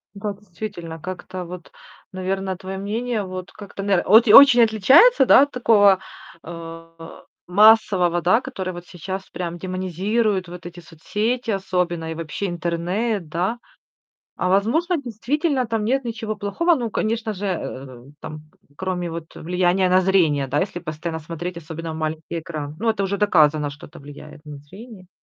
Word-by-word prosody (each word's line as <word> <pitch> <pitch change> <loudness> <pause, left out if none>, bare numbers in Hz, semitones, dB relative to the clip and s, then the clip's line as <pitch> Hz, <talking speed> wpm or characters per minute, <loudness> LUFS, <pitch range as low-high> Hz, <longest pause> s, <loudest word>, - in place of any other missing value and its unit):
Ну 200 - -11
как, 205 -1 -4
действительно, 175 -4 -8
как-то 185 +1 -7
вот, 180 -1 -10 0.4
наверное, 190 0 -3
твоё 190 +1 -7
мнение 220 +2 -2
вот 185 -1 -7
как-то, 200 -1 -9
нар 195 -3 +2
вот 220 +4 +7
и 210 - +6
очень 270 -3 +9
отличается 265 - +5
да, 260 - +7
от 285 - -3
такого, 205 -6 +4 0.4
э, 165 0 -10 0.3
массового, 190 -3 +4
да, 185 +8 +3
который 190 -9 -5
вот 175 0 -9
сейчас 190 +3 -7
прям 175 -1 -5
демонизирует 185 +3 -1
вот 175 0 -10
эти 175 0 -11
соцсети 215 +9 -3
особенно 180 -4 -2
и - - -5
вообще 165 +4 -4
интернет, 175 +3 -2
да? 180 +9 -1 0.8
А 180 - -1
возможно, 295 - +1
действительно 265 - -1
там 225 -1 -2
нет 270 +3 0
ничего 225 -2 -4
плохого? 330 - +1
Ну, 235 -5 -3
конечно 220 +1 -2
же, 205 +1 -6
э, 130 -8 -5 0.2
там 155 -1 -8 0.4
кроме 180 -2 -3
вот, 165 -1 -8
э, - - -10
влияния 180 +2 +1
на 185 +1 +4
зрение, 165 -7 +2
да, 130 - 0
если 185 -2 -3
постоянно 160 0 -5
смотреть, 170 +3 -6
особенно 165 0 -7
в - - -7
маленький 160 +1 -4
экран. 155 -2 -7
Ну 230 - 0
это 215 -3 0
уже 200 +1 -2
доказано, 155 -7 +3
что 145 +2 -11
это 165 - -14
влияет 145 +2 -13
на 150 -1 -9
зрение. 190 - -13
185 Hz, 165 wpm, -22 LUFS, 170-215 Hz, 0.8 s, очень